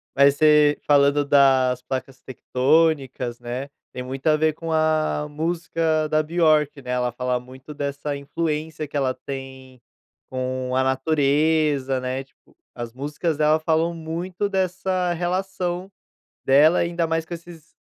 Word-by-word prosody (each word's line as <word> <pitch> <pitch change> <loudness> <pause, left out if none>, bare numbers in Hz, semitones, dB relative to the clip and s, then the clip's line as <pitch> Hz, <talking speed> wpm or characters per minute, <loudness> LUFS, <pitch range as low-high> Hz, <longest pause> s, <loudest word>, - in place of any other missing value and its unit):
mas 140 0 +5
você 150 -1 +4
falando, 145 0 +4
das 130 -3 +4
placas 130 0 -5
tectônicas, 130 -2 0
né. 125 +3 -5 0.2
Tem 125 - -5
muito 130 +3 -7
a 155 0 +4
ver 155 0 +2
com 165 +1 -6
a 155 -1 +1
música 160 0 -1
da 155 0 +1
Björk, 155 -3 +2
né. 125 -1 -6
Ela 125 -1 0
fala 125 +1 -1
muito 130 +4 -11
dessa 140 0 -3
influência, 155 +1 -3
que 145 - -13
ela 130 -2 +1
tem 130 -2 -9 0.5
com 130 0 -3
a - - +3
natureza, 140 0 +1
né. 130 +1 -3
Tipo, 135 - -30 0.2
as 120 -1 -7
músicas 150 +4 -3
dela, 155 +1 +3
falam 160 +1 +1
muito 170 +4 -4
dessa 185 -1 -1
relação 180 +1 -2 0.5
dela, 150 +5 +5
ainda 170 -1 0
mais, 165 0 0
eh, - - -35
com 175 - -6
esses 165 -1 -11
150 Hz, 145 wpm, -23 LUFS, 130-160 Hz, 0.5 s, mas